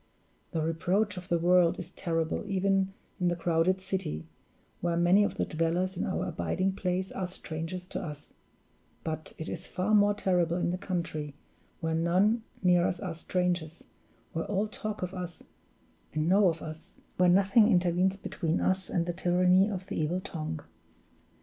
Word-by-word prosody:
The 160 -3 -1
reproach 185 +6 +1
of 180 0 -8
the 170 - +3
world 175 0 +4
is 180 0 -6
terrible 165 -1 -1
even 195 0 +1 0.3
in 180 - +2
the 175 - +2
crowded 170 +2 +2
city, 185 - -3 0.5
where 170 -1 0
many 175 +4 +5
of - - -1
the - - 0
dwellers 170 +4 0
in - - -1
our 185 - -1
abiding 185 +3 -1
place 185 0 -2
are 185 - -3
strangers 175 0 -5
to - - -3
us 150 -5 -8 0.7
but 155 -1 -4
it 160 - -5
is 175 +3 -5
far 185 +4 -1
more 205 -1 +5
terrible 180 -4 +1
in 175 - 0
the 180 - -2
country, 160 -6 -3 0.5
where 160 -1 0
none 185 +8 +3 0.2
near 180 -1 +5
us 180 - -2
are 180 -4 -4
strangers, 175 -1 -2 0.5
where 165 - -2
all 205 +1 0
talk 215 -1 -5
of 180 +1 -3
us 180 -2 -6 0.7
and 155 +1 +1
know 195 +2 +5
of 165 -1 -4
us, 155 0 -9 0.2
where 180 0 +5
nothing 195 +4 +5
intervenes 185 -1 +3
between 165 -3 -2
us 190 0 0
and 170 -3 0
the 175 - -2
tyranny 180 +3 +4
of 190 -3 -4
the 195 -4 -3
evil 165 +4 0
tongue. 160 -5 -5
180 Hz, 170 wpm, -29 LUFS, 165-190 Hz, 0.7 s, many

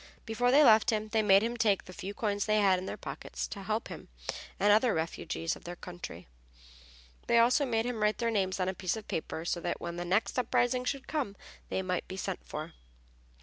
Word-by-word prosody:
Before 240 +2 +1
they 285 +4 +7
left 220 0 +6
him 215 -2 0
they 220 0 +2
made 200 -1 +6
him 235 +1 -1
take 210 -4 +2
the 185 - -10
few 200 +2 -6
coins 205 -2 -1
they 215 0 +3
had 190 -3 +4
in 185 - -6
their - - -4
pockets, - - -5
to 200 - -6
help 215 +3 -2
him - - -8 0.5
and 205 +1 +5
other 225 +1 +4
refugees 165 0 -2
of - - -14
their 175 +1 -6
country. 175 - -8 1.0
They 235 - +4
also 250 +4 +4
made 225 -2 +1
him 245 -3 -3
write 210 0 +2
their 235 -1 0
names 195 -3 0
on 185 - +1
a 190 - 0
piece 185 +2 -2
of 215 - -9
paper 160 0 -4
so 175 - -1
that - - -2
when 170 0 -5
the 175 - -2
next 195 +8 +1
uprising 250 +1 +1
should 270 +1 -3
come 270 -11 -2 0.3
they 190 - -1
might 180 -1 -2
be 190 - -6
sent 60 - -4
for. - - -6
210 Hz, 225 wpm, -31 LUFS, 185-230 Hz, 1.0 s, they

